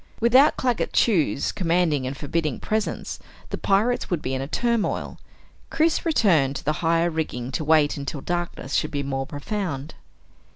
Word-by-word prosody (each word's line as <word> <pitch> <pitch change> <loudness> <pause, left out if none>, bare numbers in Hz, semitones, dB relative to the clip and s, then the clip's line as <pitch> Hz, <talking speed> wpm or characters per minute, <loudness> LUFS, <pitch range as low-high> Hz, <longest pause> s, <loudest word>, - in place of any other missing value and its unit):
Without 255 +6 +5
Claggett 250 -2 0
Chew's 170 - +2
commanding 165 -7 +1
and 135 +1 -5
forbidding 155 -1 -2
presence, 215 -1 -2 0.3
the - - -2
pirates 220 +5 +1
would 175 - 0
be 130 - -4
in 130 - -2
a 135 - -4
turmoil. 235 +5 -1 0.5
Chris 325 +1 +1
returned 165 - +3
to - - -5
the 150 - +2
higher 165 +1 +2
rigging 135 -6 -3
to 155 - -2
wait 155 -1 +3
until 140 +1 -4
darkness 175 -5 -4
should - - +1
be 145 -2 -3
more 135 -1 -3
profound. 155 -2 -4
165 Hz, 160 wpm, -24 LUFS, 140-210 Hz, 0.5 s, Without